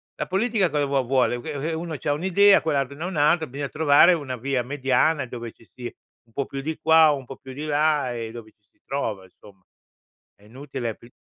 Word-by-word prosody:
La - - -4
politica 200 0 +1
cosa 145 -2 0
vuo 140 -1 0
vuole? 125 -1 +1
Che, 155 - -6 0.2
ehm, 160 - -3
uno 165 -1 -5
c'ha 145 +3 -2
un'idea, 190 +6 +4
quell'altro 140 -3 -1
ne 160 - -6
ha - - -2
un'altra, 160 -1 +2
bisogna 140 +2 -5
trovare 155 +3 +5
una 140 -6 -3
via 130 +1 -1
mediana 135 +2 +1
dove 120 -1 -7
ci 115 - -22
si 120 -1 -7 0.4
un 115 - -28
po' 140 +2 -2
più 135 - -6
di 155 +2 -4
qua, 160 -1 +6
un 135 -2 -3
po' 135 +2 -10
più 130 -1 -11
di 145 +3 -7
là 150 -3 +1
e 115 -2 -5
dove 115 -2 -11
ci 105 -2 -45
si - - -42
trova, 110 -8 -3
insomma. 95 +1 -19 0.7
È 100 - -26
inutile 125 0 -6
pri 120 - -18
140 Hz, 220 wpm, -24 LUFS, 125-155 Hz, 0.7 s, qua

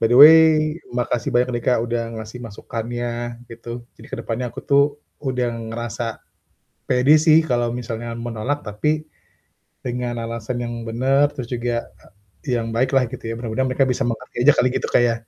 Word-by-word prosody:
By 115 +1 +2
the 125 - +6
way, 160 +2 +11 0.5
makasih 120 -1 -1
banyak 125 +1 +2
nih, 120 - -3
Kak, 125 - +4
udah 120 0 -1 0.2
ngasih 110 +3 -8
masukannya 120 +2 -5
gitu, 120 +1 -8
jadi - - -14
ke - - -4
depannya 120 +2 -3
aku - - -7
tuh 140 0 +6 0.4
udah 125 -2 0 0.2
ngerasa 115 0 -4 0.7
pede 130 +4 +4
sih 155 0 +8
kalau 120 -2 +1
misalnya 120 -1 -5
menolak, 120 +4 -2
tapi 150 +9 -1 0.8
dengan 125 -1 -3
alasan 115 +1 -4
yang 120 - -4 0.2
bener, 135 +5 +3
terus 125 -3 -5
juga, 120 -1 -1 0.6
eee, 125 - +2
yang 115 -1 -3
baik 130 +3 +1
lah, 130 - +5
gitu 130 - -7
ya, - - -2
mudah-mudahan 120 +3 -1
mereka 135 +1 +3
bisa 125 -1 -1
mengerti 115 -2 -6
aja 145 +4 +7
kali, 125 - +4
gitu, - - -2
Kak, 120 - +4
ya. 115 - +1
120 Hz, 175 wpm, -21 LUFS, 115-125 Hz, 0.8 s, way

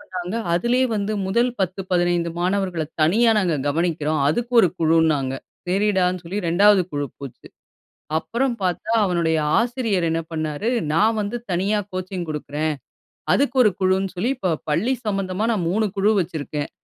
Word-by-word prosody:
பண்ணாங்க 180 +2 -6 0.2
அதிலயே 240 +8 +2
வந்து, 205 +1 -1
முதல் 235 +6 +2
10-15 175 -2 0
மாணவர்கள 185 -2 0 0.2
தனியா 225 +9 +4
நாங்க 180 -5 +1
கவனிக்கிறோம். 155 -1 0
அதுக்கு 240 +9 -1
ஒரு 185 - +4
குழுன்னாங்க. 160 -4 +2 0.4
சரிடான்னு 185 -2 +1
சொல்லி 190 +5 -4
2வது 195 +3 +5
குழு 145 0 -2
போச்சு. 140 -3 -10 0.7
அப்புறம் 240 +8 -1
பாத்தா, 185 +5 -1
அவனுடைய 170 -3 +1 0.2
ஆசிரியர் 230 -7 0
என்னா 165 0 -1
பண்ணாரு, 155 +6 -2 0.2
நான் 215 +7 +3
வந்து 210 +3 -3
தனியா 195 +4 +1
கோச்சிங் 185 -1 -4
குடுக்குறேன். 155 0 -2 0.6
அதுக்கு 275 -1 +1
1 210 - +4
குழுன்னு 190 0 +1
சொல்லி, 230 +9 0
இப்போ 185 -7 -1 0.2
பள்ளி 220 - +1
சம்மந்தமா, 195 0 -1
நான் 180 -6 -1
3 215 +2 +1
குழு 205 +3 +3
வச்சிருக்கேன் 150 -3 -4
185 Hz, 140 wpm, -22 LUFS, 165-210 Hz, 0.7 s, 2வது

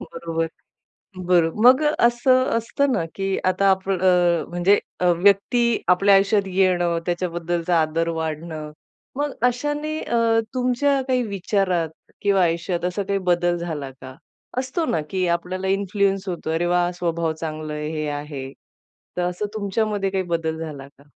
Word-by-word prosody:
बरोबर. 165 -1 -3 0.8
बरो 175 -2 +3
मग 260 +4 +7
असं 255 -3 +3
असतं 275 +5 0
ना 190 -9 +1
की 195 0 -2 0.2
आता 190 +2 +3
आपल 190 -1 0
अ, 175 -2 +3
म्हणजे 175 +4 +3 0.2
अ, 180 - 0
व्यक्ती 205 +5 +3
आपल्या 195 +2 +5
आयुष्यात 195 0 +3
येणं 175 -3 +2
त्याच्याबद्दलचा 175 -1 -1
आदर 165 +2 0
वाढणं. 155 -1 -5 0.4
मग 290 +1 -1 0.2
अशाने 295 +5 -2
अ, 235 - -1 0.4
तुमच्या 255 +2 +1
काही 255 -1 +2
विचारात 190 -4 0 0.3
किंवा 200 -2 +3
आयुष्यात 170 +1 -1
असा 180 +3 -1
काही 200 0 -1
बदल 175 0 +1
झाला 160 -5 -4
का? 130 0 -10 0.4
असतो 265 +6 -1
ना 160 - 0
की 185 -1 0
आपल्याला 180 +2 -2
इन्फ्लुअन्स 195 0 0
होतो 170 -2 -4
अरे 165 +2 0
वाह! 175 0 +2
स्वभाव 170 -2 -1
चांगलं 155 -1 -5
आहे, 150 0 -4
हे 155 -1 -3
आहे. 145 -2 -5 0.7
तर - - +1
असं 180 +4 -2
तुमच्यामध्ये 205 -1 -1
काही 190 -1 -1
बदल 160 -1 -2
झाला 145 -4 -7
का? 140 0 -22
180 Hz, 145 wpm, -22 LUFS, 165-205 Hz, 0.8 s, मग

